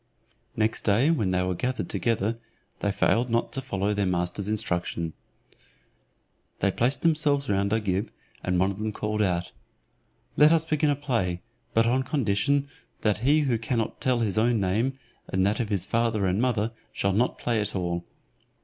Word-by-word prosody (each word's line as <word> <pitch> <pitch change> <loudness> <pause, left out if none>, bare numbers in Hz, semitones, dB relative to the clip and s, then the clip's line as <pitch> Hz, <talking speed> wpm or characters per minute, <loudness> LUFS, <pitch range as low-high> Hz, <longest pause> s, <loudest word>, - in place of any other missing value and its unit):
Next 110 +1 0
day 115 +9 +3
when 110 - +1
they 90 0 +1
were 90 0 0
gathered 125 +7 -2
together, 115 -1 -1 0.4
they 100 - 0
failed 115 +4 +2
not 115 0 0
to 135 - 0
follow 100 -5 -1
their 100 -2 0
master's 90 +2 -1
instructions. 90 -5 -1 1.4
They 100 - +1
placed 125 +7 +1
themselves 150 -4 +2
round 100 0 +1
Agib, 105 -3 0 0.3
and 90 -1 +1
one 95 +2 +2
of 100 - -8
them 110 0 -2
called 105 +1 -2
out, 90 -3 0 0.8
"Let 150 +1 +6
us 165 -1 +3
begin 155 -1 +1
a 145 - +2
play, 115 -11 -1 0.3
but 115 +1 +5
on 125 +3 +2
condition 135 0 +1 0.3
that 105 -1 +1
he 145 +6 +3
who 125 -6 +1
cannot 115 0 -2
tell 125 -2 +1
his 110 -2 +1
own 115 0 +2
name, 110 +8 0 0.3
and 95 0 +1
that 105 +4 +1
of 115 -4 -1
his 95 -4 0
father 115 -3 +1
and 95 +3 +1
mother, 115 -3 +1 0.2
shall 100 0 0
not 120 +6 +1
play 115 -3 0
at 105 - -2
all." 85 -2 -2
110 Hz, 175 wpm, -26 LUFS, 95-125 Hz, 1.4 s, Let